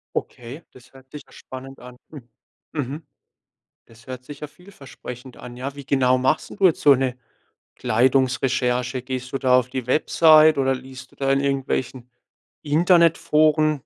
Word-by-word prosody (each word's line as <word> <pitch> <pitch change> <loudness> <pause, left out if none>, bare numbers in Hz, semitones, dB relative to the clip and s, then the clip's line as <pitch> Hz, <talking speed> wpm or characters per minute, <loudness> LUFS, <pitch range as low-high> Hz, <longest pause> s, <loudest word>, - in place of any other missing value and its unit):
Okay, 125 +7 -6
das 130 +1 -19
hört 130 0 -19
sich 150 -2 -10
ja - - -22
spannend 130 +1 -11
an. 125 0 -13 0.7
Mhm. 145 +1 -5 0.8
Das 115 +3 -20
hört 130 -1 -8
sich 145 +1 -11
ja 150 - -7
vielversprechend 135 -7 -12
an. 120 0 -11
Ja, 135 +2 -6
wie 140 -1 -10
genau 130 -1 +2
machst 130 +4 0
denn - - -10
du 195 - +2
jetzt 165 - -1
so 145 -2 +6
'ne 130 -1 -2 0.6
Kleidungsrecherche? 125 -1 0
Gehst 130 0 -6
du 135 - 0
da 125 -1 +3
auf 125 - -5
die 130 -1 -5
Website, 155 +3 +4
oder 135 -1 +1
liest 130 0 -10
du - - -24
da 135 0 0
in 135 - +1
irgendwelchen 130 -2 -3 0.5
Internetforen? 155 -2 +2
135 Hz, 160 wpm, -22 LUFS, 125-145 Hz, 0.8 s, so